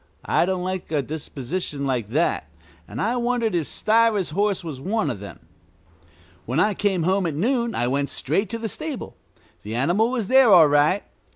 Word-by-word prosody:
I 175 - +2
don't 185 -1 -1
like 185 -2 -4
a 145 -3 +1
disposition 145 +1 -4
like 125 -6 -1
that, 130 - 0 0.4
and 105 - -7
I 235 +3 0
wondered 240 -3 0
if 165 -4 -1
Stiver's 215 -5 +2
horse 200 +2 0
was 150 -6 -7
one 190 -3 -1
of 110 - -6
them. 100 0 -10 1.1
When 130 +7 0
I 210 +4 +3
came 190 -3 0
home 185 +1 +1
at 155 - -3
noon 235 - 0
I 120 - 0
went 140 +2 0
straight 185 +9 -1
to 230 - -3
the 225 0 -4
stable. 305 +3 -6 0.5
The 110 +2 -6
animal 175 - +2
was 240 -6 -2
there 260 -2 +6
all 170 -5 +8
right. 145 +7 +3
180 Hz, 185 wpm, -23 LUFS, 145-220 Hz, 1.1 s, all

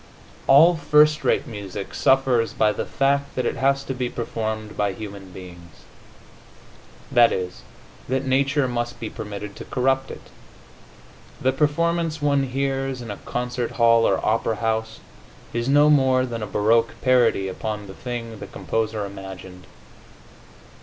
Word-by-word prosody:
All 160 +5 +7
first 150 -1 +4
rate - - +1
music 100 -3 -7
suffers 130 -3 +2
by 105 -1 +2
the - - -4
fact 140 +1 0
that 130 - -1
it - - -1
has 135 +1 +1
to 135 - -4
be 125 -1 -2
performed 110 -2 -4
by 100 -2 0
human 100 -2 -9
beings 85 -2 -13 1.3
that 120 -1 +6
is, 90 -1 -4 0.5
that 130 +1 0
nature 135 +1 +2
must 120 -1 -3
be 110 - -5
permitted 105 -1 -7
to - - -8
corrupt 135 +1 0
it. - - -11 1.1
The 130 - +2
performance 160 +3 0
one 140 -2 +2
hears 135 -1 -2
in 115 - -6
a 100 - -6
concert 125 -1 -4
hall 115 -1 +4
or - - +2
opera 115 +1 +1
house 110 0 -2 0.5
is 120 +2 -1
no 145 +2 +5
more 130 -3 +4
than 115 -2 -5
a 105 - -4
baroque 115 +3 +2
parody 120 -6 +3
upon 105 +2 -4
the 95 - -10
thing 115 -1 -6
the - - -8
composer 110 -2 -2
imagined. 95 -2 -10
120 Hz, 145 wpm, -23 LUFS, 105-135 Hz, 1.3 s, All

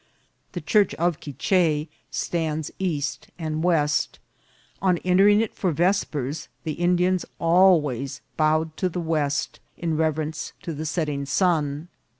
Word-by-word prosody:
The - - -4
church 210 -3 +2
of 170 -1 0
Quiche 150 +2 +1 0.2
stands 160 -3 -2
east 160 -7 -2
and 155 -1 -3
west. 150 -4 +1 0.6
On 185 -2 +3
entering 200 +3 +5
it 225 - -2
for 185 - 0
vespers 160 -4 0 0.2
the 160 - -2
Indians 180 +2 +2
always 165 -7 +3
bowed 155 0 +1
to 185 - 0
the 180 - -4
west, 155 -4 -1 0.2
in 165 -2 -1
reverence 155 0 -1
to 165 - -4
the 155 +2 -4
setting 150 -4 -2
sun. 150 -2 +1
160 Hz, 130 wpm, -24 LUFS, 150-180 Hz, 0.6 s, entering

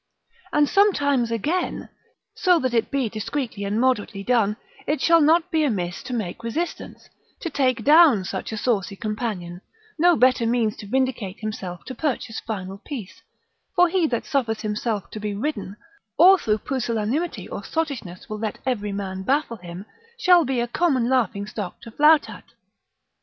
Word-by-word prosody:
And 295 -2 +3
sometimes 285 - +3
again, 295 - -2 0.5
so 360 -3 +3
that 255 -5 -1
it 230 -2 +1
be 275 -4 0
discreetly 225 0 -4
and 205 +2 -1
moderately 220 -5 0
done, 215 -3 +2 0.3
it 300 +1 0
shall 335 0 +5
not 330 +4 +3
be 320 -2 +2
amiss 180 -10 -1
to - - -8
make 215 -6 -3
resistance, 315 +10 -4 0.3
to 335 - -4
take 255 -5 +1
down 295 - +6
such 190 +2 -5
a 220 - -4
saucy 205 -4 0
companion, 205 -5 -4 0.4
no 350 +1 +5
better 250 -1 +3
means 230 -2 +1
to 205 - -9
vindicate 245 -5 -1
himself 190 -5 -5
to 260 - -6
purchase 255 -5 -2
final 195 -3 -6
peace: 230 -5 -8 0.5
for 355 0 +5
he 350 -2 +2
that 235 -5 -2
suffers 235 -6 -1
himself 210 -1 -3
to 215 - -6
be 210 -1 -3
ridden, 210 -5 -4 0.4
or 380 +1 +7
through 215 -6 +1
pusillanimity 245 +5 -2
or - - -6
sottishness 270 - -4
will 215 0 -5
let 220 -1 -3
every 210 -6 -1
man 190 -1 -4
baffle 265 +2 0
him, 180 +1 -9 0.3
shall 360 -5 +5
be 260 -1 -1
a 240 - 0
common 255 -3 +1
laughing 225 -6 +1
stock 205 -3 -6
to 230 - -11
flout 300 +5 +5
at. - - -11
235 Hz, 165 wpm, -23 LUFS, 210-290 Hz, 0.5 s, or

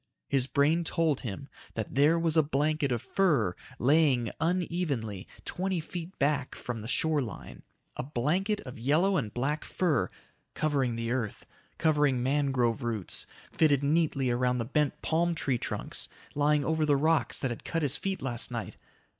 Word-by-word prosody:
His 135 -2 +1
brain 150 +5 +3
told 160 -4 +1
him 120 +3 -6 0.3
that 110 -2 -4
there 145 +5 +4
was 165 -1 +1
a 160 - +7
blanket 150 0 0
of 120 -2 -1
fur 135 - +2 0.2
laying 135 -4 +3
unevenly 160 - -1 0.2
twenty 185 -1 -1
feet 175 +3 -7
back 140 -1 0
from 120 -2 -5
the 110 - -7
shore 155 +3 +2
line. 115 -7 -7 0.4
A - - -1
blanket 155 - 0
of 125 -3 -9
yellow 160 +11 +3
and 120 - -1
black 140 +6 -1
fur... 160 -9 0 0.5
covering 140 -6 +1
the 115 0 -2
earth, 120 -4 -2 0.3
covering 145 -6 +2
mangrove 135 -3 +1
roots, 115 -6 -3 0.2
fitted 145 -3 +3
neatly 145 -4 +2
around 125 +1 +1
the 115 - -1
bent 150 +3 0
palm 170 +1 +1
tree 135 -6 0
trunks, - - -3 0.2
lying 145 0 +2
over 160 +1 +1
the 150 -2 +4
rocks 155 -4 +2
that 130 - -1
had 120 - -6
cut 165 -1 -2
his 140 -1 +1
feet 195 -5 -3
last 120 -3 -3
night - - -5
145 Hz, 165 wpm, -29 LUFS, 125-160 Hz, 0.5 s, a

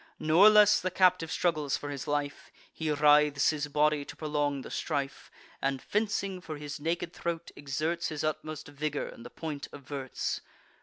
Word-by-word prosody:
Nor 170 +7 +6
less 210 -1 +6
the 185 - 0
captive 180 -3 +3
struggles 155 -5 0
for 145 - -6
his 140 +1 -6
life: 145 -1 -2 0.2
He 160 -1 -3
writhes 150 -1 +4
his 150 -1 -3
body 150 0 +2
to - - -9
prolong 145 -2 -1
the - - -9
strife, 140 -3 -3 0.3
And, 135 0 0
fencing 200 -2 -1
for 155 -3 -6
his 145 0 -6
naked 170 +2 -2
throat, 170 -1 -4
exerts 155 +5 -2
His 155 -2 -4
utmost 155 0 -3
vigour, 145 0 -3
and 115 - -10
the 120 - -9
point 150 -1 -6
averts. 140 -1 -4
150 Hz, 165 wpm, -30 LUFS, 145-165 Hz, 0.3 s, Nor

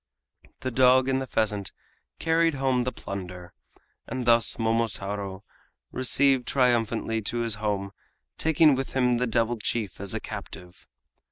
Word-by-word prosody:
The 130 - -3
dog 130 +1 +5
and 135 0 +1
the 130 - -5
pheasant 105 -4 -1 0.5
carried 165 -1 +2
home 130 -2 +1
the 125 - -1
plunder, 90 -4 -7 0.5
and 125 +1 -4
thus 115 -3 +3
Momotaro 100 -4 -2 0.5
returned 130 0 +2
triumphantly 115 -3 +1
to 120 +3 -2
his 115 -2 +1
home, 100 -2 -1 0.4
taking 160 -1 +4
with 135 0 -3
him 125 -2 +2
the 125 - 0
devil 115 0 0
chief 105 -4 -3
as 100 -2 -1
a - - -1
captive. 90 0 -9
120 Hz, 140 wpm, -26 LUFS, 105-130 Hz, 0.5 s, dog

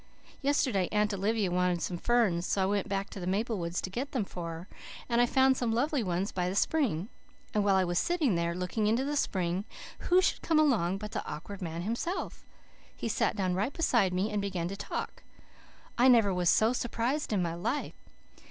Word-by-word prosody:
Yesterday 255 -9 +1
Aunt 210 0 +1
Olivia 200 0 0
wanted 180 -1 +1
some 175 -2 -3
ferns, 210 -8 +2
so 195 - +1
I - - +2
went 200 0 -1
back 195 0 -2
to - - -7
the 180 - -5
maple 210 +3 0
woods 170 +1 -2
to - - -4
get 260 +8 -4
them 240 -7 0
for 175 -3 -6
her, 165 +3 -8 0.4
and 235 0 +2
I 245 - +4
found 265 +1 +4
some 240 -2 0
lovely 275 +4 +1
ones 185 0 -1
by 180 -1 -1
the 190 - -3
spring. 210 - +1 0.5
And 210 - +2
while 200 -1 +3
I 190 - +4
was 175 -1 0
sitting 335 - +1
there, 170 0 0
looking 185 +4 -1
into 235 +5 +2
the 295 +1 -1
spring 185 -8 0 0.4
who 360 +1 +3
should 375 - +1
come 325 - +1
along 220 - +3
but 210 +1 -7
the - - -3
Awkward 180 +7 -7
Man 165 -1 -4
himself. 235 - -3 0.5
He - - -4
sat 225 0 0
right 185 -2 0
down 195 +7 0
beside 240 - +2
me 190 +4 -1
and 210 -1 -1
began 185 -4 -2
to 195 - -5
talk. 205 - -5 0.8
I 250 - +6
never 225 -6 +5
was 180 -1 +2
so 220 +3 +4
surprised 245 +4 -1
in 195 -4 +1
my 170 -1 -2
life. 175 +12 -2
200 Hz, 210 wpm, -30 LUFS, 180-240 Hz, 0.8 s, I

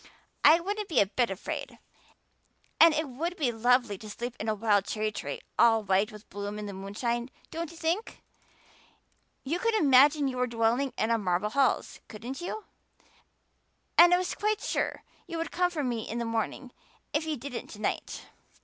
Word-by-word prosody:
I 315 +3 +8
wouldn't 405 +3 -3
be 310 - +3
a 200 - +6
bit 235 +5 0
afraid, 195 -1 -5 1.0
and 330 - +9
it 310 0 -1
would 330 +8 -4
be 270 -6 +1
lovely 235 -2 +2
to 215 - -9
sleep 240 +3 -5
in 220 - -2
a 215 - +1
wild 205 -2 +2
cherry 215 0 -2
tree - - -5 0.2
all 225 -2 +5
white 195 +3 +2
with 210 0 -13
bloom 205 +1 -5
in 210 - -5
the 200 - -6
moonshine, 235 +6 -3 0.2
don't 335 -1 -4
you 335 - -13
think? 340 +7 -2 1.2
You 320 +6 -2
could 460 +3 +1
imagine 285 -3 +5
you 255 -1 -3
were 250 0 +1
dwelling 235 +3 +1
in 225 0 +1
marble 185 +2 0
halls, 275 +1 +1
couldn't 240 +8 -7
you? 420 +5 -5 1.3
And 345 +1 +8
I 355 - +6
was 365 0 -2
quite 425 0 -1
sure - - -2 0.2
you 335 - -5
would 330 - -3
come 360 0 +2
for 320 -5 -3
me 240 -3 -1
in 230 - -3
the 235 - -2
morning, 230 +3 -3 0.4
if 300 +1 +1
you 310 -2 -1
didn't 250 0 -6
to 210 - -11
night." - - -3
245 Hz, 185 wpm, -29 LUFS, 215-320 Hz, 1.3 s, and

